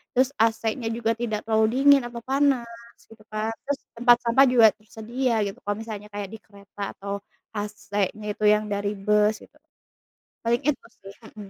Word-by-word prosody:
terus 260 +1 +3
AC-nya 225 +1 +1
juga 225 0 0
tidak 220 -2 -3
terlalu 220 +1 +2
dingin 285 -1 +7
atau 240 0 -7
panas, 240 -4 -1
gitu 225 -1 -18
kan. 215 +1 -2 0.2
Terus 285 -1 -1 0.2
tempat 240 0 +7
sampah 240 +3 +5
juga 240 -3 +7
tersedia 225 +2 -2
gitu, 200 - -6
kalau 205 0 -1
misalnya 215 -2 -7
kayak 205 -1 -6
di 220 - -8
kereta 200 -1 -8
atau 200 0 -4 0.3
AC-nya 210 0 -3
itu 215 - -8
yang 210 0 +4
dari 205 +1 -1
bus 210 +2 +2
gitu. - - -20 0.9
Paling 235 +2 +2
itu 300 -2 0 0.2
sih, 195 0 -11 0.2
mhm. 205 -2 -9
220 Hz, 165 wpm, -25 LUFS, 210-235 Hz, 0.9 s, dingin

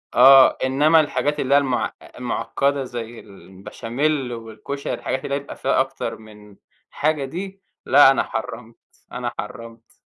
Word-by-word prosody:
آه، 135 +1 +7
إنَّما 150 +5 +4
الحاجات 150 -1 -1
اللي 135 +1 0
هي - - +7
المع 130 -3 0 0.3
المعقدة 140 +2 -1
زي 120 -2 -7
البشاميل 115 +8 -4
والكُشري 115 +5 -6
الحاجات 130 - -3
اللي 140 - -2
هي 140 - -1
يبقى 140 - -10
فيها - - 0
أكتر - - -4
من 105 -2 -16 0.3
حاجة 150 -1 -1
دي، 190 +7 -7 0.2
لأ، 140 0 +7
أنا 135 - +1
حرَّمت، 115 +1 -6 0.4
أنا 125 -1 -4
حرَّمت. 115 0 -9
130 Hz, 145 wpm, -21 LUFS, 115-140 Hz, 0.4 s, آه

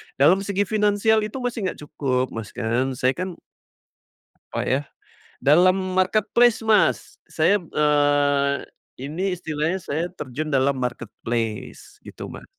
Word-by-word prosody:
dalam 160 +8 +5
segi 200 0 0
finansial 210 +1 +3
itu 215 - -8
masih 235 -5 -2
nggak - - -13
cukup 130 -3 -1
Mas 110 -2 -6
kan 125 +3 -1
saya 130 +1 +2
kan, 185 0 -4 1.2
apa - - -3
ya, 130 +2 +2 0.6
dalam 175 +6 +5 0.2
marketplace 215 +5 +3
Mas 220 -2 +2
saya, 170 +6 +2
eee, 145 -3 +2 0.5
ini 175 +8 -2
istilahnya 160 +1 -2
saya 160 +2 -2
terjun 155 0 -5
dalam 135 +1 +2
marketplace 115 -2 -4
gitu - - -8
Mas. - - -10
150 Hz, 125 wpm, -23 LUFS, 135-190 Hz, 1.2 s, dalam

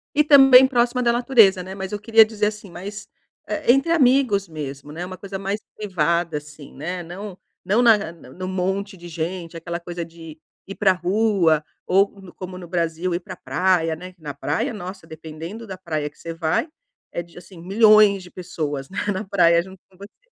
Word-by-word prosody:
E 300 - +5
também 270 -3 +8
próxima 245 -1 +1
da 240 -1 +3
natureza, 230 -6 +4
né. 190 +1 -8
Mas 190 -1 -6
eu 210 - -3
queria 225 +1 +6
dizer 215 -1 -1
assim, 210 -1 -6
mas, 200 +5 -8 0.4
hã, - - -2
entre 270 +7 +4
amigos 255 - +3
mesmo, 145 -3 -7
né. 170 +4 -5
Uma 185 0 -8
coisa 195 0 -7
mais 195 +2 -2 0.2
privada, 170 -5 0
assim, 150 -1 -11
né 175 +6 -4
não 185 +3 -8 0.3
não 210 +6 +2
na 230 -2 +7 0.2
a - - -8
no 170 +2 -10
monte 190 +1 -2
de 175 0 -11
gente, 170 +1 -5
aquela 170 +1 -5
coisa 175 0 -6
de 165 -1 -12 0.3
ir 195 - -7
pra 200 -2 +3
rua 185 -3 +2 0.2
ou 195 +2 +4
c 185 -2 -12
como 185 0 -8
no 180 -1 -9
Brasil, 170 0 -1
ir 175 - -3
pra 185 0 -9
praia, 175 -3 +1
né. 180 +3 -10
Que 175 - -33
na 145 -2 -6
praia, 145 - -2
nossa, 190 -3 -8
dependendo 160 +7 -9
da 190 -3 -8
praia 155 -5 -3
que 150 - -30
você 165 - -6
vai, 165 - 0 0.4
é - - -3
de, 170 +1 -19
assim, 180 0 -13
milhões 210 +1 +5
de 180 - -13
pessoas, 150 -6 -5
né, 195 - -10 0.2
na 190 +3 -3
praia, 170 -4 +4
junto 190 0 -13
com 185 - -24
você. 200 - -14
185 Hz, 200 wpm, -22 LUFS, 165-210 Hz, 0.4 s, também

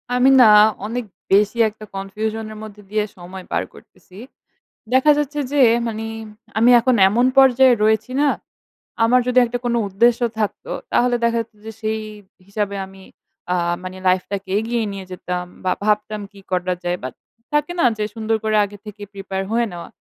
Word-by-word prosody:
আমি 250 +2 +4
না 245 - +8 0.4
অনেক 235 +2 -4 0.3
বেশি 210 +3 +3
একটা 215 0 -13
confusion 215 +3 -4
এর 215 - -11
মধ্যে 210 -1 -11
দিয়ে 215 0 0
সময় 180 +1 -10
পার - - 0
করতেছি। 185 - -18 0.8
দেখা 260 +4 +5
যাচ্ছে 295 0 -2
যে, 290 - +2 0.3
মানি 225 -1 -4 0.5
আমি 235 +2 +5
এখন 255 +2 +2
এমন 235 +5 +2
পর্যায়ে 265 -1 +6
রয়েছি 220 +2 +1
না, 295 - +3 0.8
আমার 245 +2 +4
যদি 250 0 +4
একটা 245 +1 -3
কোন 240 - 0
উদ্দেশ্য 230 +5 +2 0.2
থাকত 210 -2 -2 0.3
তাহলে 245 0 +2
দেখা 235 0 +2
যেত 225 - -11
যে 225 - -6
সেই 220 0 -1 0.5
হিসাবে 200 0 -3
আমি 190 0 -15 0.5
আ - - +1 0.3
মানে 185 0 -7
লাইফটাকে 190 +1 -1
এগিয়ে 230 +1 -1
নিয়ে 195 -1 -7
যেতাম 180 0 -4 0.2
বা, 185 - +2
ভাবতাম 210 0 0
কি 200 - -16
করা 180 0 0
যায়? 175 0 -1
বাট 130 - -5 0.4
থাকে 295 +2 +1
না - - +3
যে 215 - -1
সুন্দর 225 0 -1
করে 215 0 0
আগে 205 +1 -11
থেকে 210 0 -10
প্রিপেয়ার 195 -1 -4
হয়ে 235 +1 +2
নেওয়া। 175 -1 -8
215 Hz, 170 wpm, -20 LUFS, 195-240 Hz, 0.8 s, না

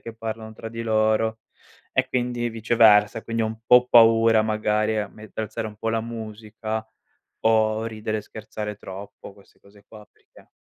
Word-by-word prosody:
che 115 - -9
parlano 110 0 -6
tra 115 0 -8
di 115 +1 -6
loro 110 0 +1 0.5
e 130 0 +1
quindi 120 -1 -1
viceversa; 110 -1 +4
quindi 115 0 -2
ho - - +1
un 110 0 -6
po' 125 0 +6
paura, 115 -1 +6
magari 110 0 0
a 105 - -1
me 110 - -14
a 110 - -14
alzare 110 +1 -4
un 105 - -13
po' 115 +1 -2
la 115 - 0
musica, 110 -1 -6 0.6
o 110 0 +2
ridere 110 -1 -3
e - - -4
scherzare 105 0 -7
troppo, 100 0 -10
queste 100 - -23
cose 100 0 -21
qua, 105 -3 -14
perché - - -22
110 Hz, 175 wpm, -24 LUFS, 110-115 Hz, 0.6 s, po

